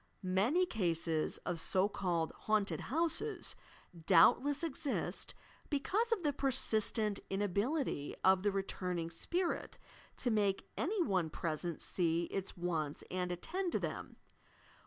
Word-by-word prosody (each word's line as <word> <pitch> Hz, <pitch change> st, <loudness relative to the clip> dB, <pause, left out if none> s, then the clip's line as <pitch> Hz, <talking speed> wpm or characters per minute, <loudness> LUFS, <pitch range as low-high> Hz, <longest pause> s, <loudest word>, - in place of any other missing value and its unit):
Many 205 Hz, -, +3 dB
eases 165 Hz, -6 st, 0 dB
of 170 Hz, -, -1 dB
so 190 Hz, +3 st, +3 dB
called 175 Hz, -5 st, -1 dB, 0.2 s
"haunted 215 Hz, -1 st, +2 dB
houses'" 340 Hz, -, 0 dB, 0.5 s
doubtless 255 Hz, -, +5 dB
exist, 295 Hz, -2 st, -2 dB, 0.3 s
because 405 Hz, +11 st, +1 dB
of 420 Hz, -6 st, +1 dB
the 295 Hz, -2 st, +2 dB
persistent 220 Hz, -6 st, +1 dB
inability 205 Hz, -, -1 dB
of 190 Hz, 0 st, +5 dB
the 205 Hz, +1 st, +2 dB
returning 180 Hz, -3 st, -2 dB
spirit 345 Hz, -, -2 dB, 0.4 s
to 245 Hz, -, 0 dB
make 200 Hz, -3 st, +1 dB
any 380 Hz, +4 st, +1 dB
one 185 Hz, -, +1 dB
present 165 Hz, +1 st, -3 dB
see 170 Hz, -2 st, +1 dB
its 195 Hz, -1 st, -4 dB
wants 160 Hz, -4 st, -2 dB
and 180 Hz, -1 st, -1 dB
attend 345 Hz, -, -2 dB
to -, -, +2 dB
them. -, -, -5 dB
200 Hz, 120 wpm, -35 LUFS, 175-290 Hz, 0.5 s, doubtless